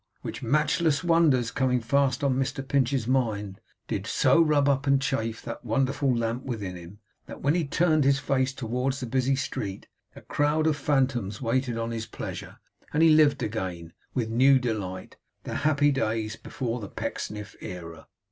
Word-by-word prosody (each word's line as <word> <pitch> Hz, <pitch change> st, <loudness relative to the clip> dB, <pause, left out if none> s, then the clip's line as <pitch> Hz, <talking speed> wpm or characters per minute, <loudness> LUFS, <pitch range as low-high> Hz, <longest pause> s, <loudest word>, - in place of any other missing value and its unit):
Which -, -, -6 dB
matchless 150 Hz, +4 st, +1 dB
wonders, 155 Hz, -9 st, +3 dB
coming 125 Hz, +2 st, +1 dB
fast 130 Hz, +2 st, +1 dB
on 140 Hz, -2 st, +3 dB
Mr 135 Hz, +1 st, -2 dB
Pinch's 135 Hz, -3 st, +1 dB
mind, 110 Hz, -6 st, -1 dB, 0.3 s
did -, -, -3 dB
so 165 Hz, -, +4 dB
rub 150 Hz, -3 st, +3 dB
up 140 Hz, 0 st, +1 dB
and 140 Hz, 0 st, +4 dB
chafe 115 Hz, -4 st, -2 dB
that 115 Hz, -, -7 dB
wonderful 135 Hz, +4 st, +1 dB
lamp 115 Hz, +2 st, -2 dB
within 105 Hz, -8 st, -4 dB
him, 90 Hz, +3 st, -11 dB, 0.3 s
that -, -, -10 dB
when 140 Hz, +2 st, +3 dB
he 170 Hz, -2 st, +1 dB
turned 155 Hz, 0 st, +2 dB
his 135 Hz, 0 st, +4 dB
face 135 Hz, -1 st, 0 dB
towards 130 Hz, +1 st, -2 dB
the 130 Hz, -, -4 dB
busy 130 Hz, +2 st, +1 dB
street, 100 Hz, -7 st, -4 dB, 0.3 s
a -, -, -11 dB
crowd 150 Hz, +2 st, +1 dB
of 160 Hz, -1 st, +3 dB
phantoms 130 Hz, -8 st, 0 dB
waited 125 Hz, 0 st, -1 dB
on 115 Hz, 0 st, -2 dB
his 115 Hz, -1 st, -4 dB
pleasure, -, -, -7 dB, 0.3 s
and 155 Hz, +2 st, +2 dB
he 165 Hz, -, +7 dB
lived 150 Hz, -4 st, +5 dB
again, 90 Hz, -6 st, -4 dB, 0.2 s
with 120 Hz, -4 st, 0 dB
new 130 Hz, +4 st, +5 dB
delight, 105 Hz, -7 st, -4 dB, 0.3 s
the -, -, -5 dB
happy 145 Hz, 0 st, +3 dB
days 110 Hz, -4 st, -1 dB
before 125 Hz, -1 st, -4 dB
the 105 Hz, -, -7 dB
Pecksniff 105 Hz, -1 st, -5 dB
era. 80 Hz, -3 st, -8 dB
130 Hz, 170 wpm, -27 LUFS, 115-140 Hz, 0.3 s, he